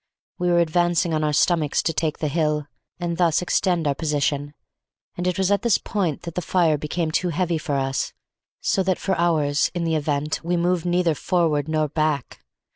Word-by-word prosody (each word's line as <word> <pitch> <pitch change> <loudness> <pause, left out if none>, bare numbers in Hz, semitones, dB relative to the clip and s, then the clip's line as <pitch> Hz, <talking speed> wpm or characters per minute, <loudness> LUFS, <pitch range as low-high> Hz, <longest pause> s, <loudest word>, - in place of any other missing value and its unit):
We 180 0 +1
were 175 - +3
advancing 170 0 +2
on 155 0 0
our 150 - +1
stomachs 155 0 +2
to 165 - 0
take 160 -1 -1
the 155 - -2
hill, 150 -1 0 0.3
and 170 -1 -2
thus 170 -3 +3
extend 175 -1 +1
our 140 - +2
position, 145 -1 -1 0.6
and 180 +1 -2
it 180 +1 0
was 190 0 +1
at 200 - +2
this 235 -3 +3
point 180 -8 -2
that 170 -2 -6
the 180 - -2
fire 170 -3 +2
became 155 +2 -2
too 180 +3 0
heavy 175 -1 0
for 150 -3 -2
us, 135 -1 -1 0.5
so 195 - +1
that 185 -1 +1
for 190 - -1
hours 155 -4 +2
(in 175 - -1
the 165 -1 0
event) 150 0 -1
we 175 +1 0
moved 175 0 0
neither 175 -1 +2
forward 155 -3 0
nor 155 -1 +1
back. 150 - -2
165 Hz, 200 wpm, -23 LUFS, 150-175 Hz, 0.6 s, were